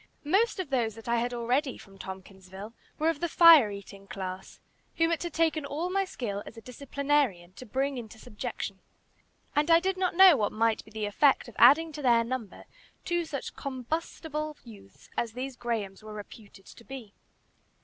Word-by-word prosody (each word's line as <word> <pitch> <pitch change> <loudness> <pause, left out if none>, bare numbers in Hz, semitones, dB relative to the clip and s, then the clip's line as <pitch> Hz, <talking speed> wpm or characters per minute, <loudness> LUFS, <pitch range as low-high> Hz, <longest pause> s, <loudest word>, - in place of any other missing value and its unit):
Most 395 +8 +2
of 345 -7 -4
those 230 -5 0
that 225 0 -12
I 235 0 +2
had 240 +1 -1
already 250 +4 -1
from 195 -1 -16
Tompkinsville 190 +2 -9 0.2
were 315 +2 +2
of 325 -3 -2
the 345 - -1
fire 325 -11 +8
eating 200 0 -10
class, 190 -1 -7 0.4
whom 330 0 +2
it 335 - 0
had 345 - -3
taken 320 -2 +1
all 310 +6 -3
my 390 +1 +1
skill 210 - -4
as 230 - -11
a - - -9
disciplinarian 255 -7 -1
to 250 +5 -11
bring 270 +3 -1
into 225 -2 -10
subjection, 210 -3 -6 0.8
and 295 +2 +2
I 330 0 +7
did 380 +2 -1
not 370 -2 0
know 375 -2 +9
what 210 -5 -1
might 225 0 +1
be - - -17
the 215 -1 -4
effect 265 +8 +3
of 240 - -12
adding 325 +2 +7
to 300 0 -7
their 235 -3 +4
number 230 -4 -5 0.4
two 345 -1 0
such 280 -4 -6
combustible 300 +3 -4
youths 200 -5 -15
as 230 -2 -1
these 260 +2 -5
Grahams 220 -6 -3
were 215 0 -10
reputed 205 -1 -12
to - - -14
be. 245 -5 -9
250 Hz, 185 wpm, -28 LUFS, 210-305 Hz, 0.8 s, know